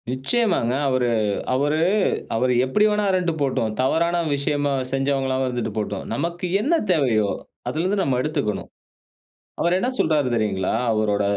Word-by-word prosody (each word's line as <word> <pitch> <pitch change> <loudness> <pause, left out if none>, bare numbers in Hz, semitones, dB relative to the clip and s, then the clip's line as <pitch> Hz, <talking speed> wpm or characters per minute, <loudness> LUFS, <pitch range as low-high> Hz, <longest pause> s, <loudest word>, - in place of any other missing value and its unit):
நிச்சயமாங்க. 130 - +1 0.2
அவரு 130 -2 +1 0.4
அவரு 145 +4 +1 0.6
அவரு 125 +2 +2
எப்படி 210 +11 +2
வேணா 210 0 +1
இருந்துட்டு 180 -3 0
போட்டும். 130 -5 0
தவறான 170 +6 +1 0.2
விஷயமா 145 0 0 0.2
செஞ்சவங்களாவும் 135 -1 0
இருந்துட்டு 120 -3 -2
போட்டும். 105 -2 -3
நமக்கு 170 +8 -3 0.2
என்ன 295 +9 +1 0.2
தேவையோ, 120 - +2 0.4
அதுலருந்து 185 +5 0
நம்ம 135 -7 +1
எடுத்துக்கணும். 145 -8 -2 0.9
அவரு 170 - +2
என்ன 245 - 0
சொல்றாரு 150 -4 +2
தெரியுங்களா, 100 -4 0 0.2
அவரோட 105 -2 +1
135 Hz, 125 wpm, -22 LUFS, 120-170 Hz, 0.9 s, அவரு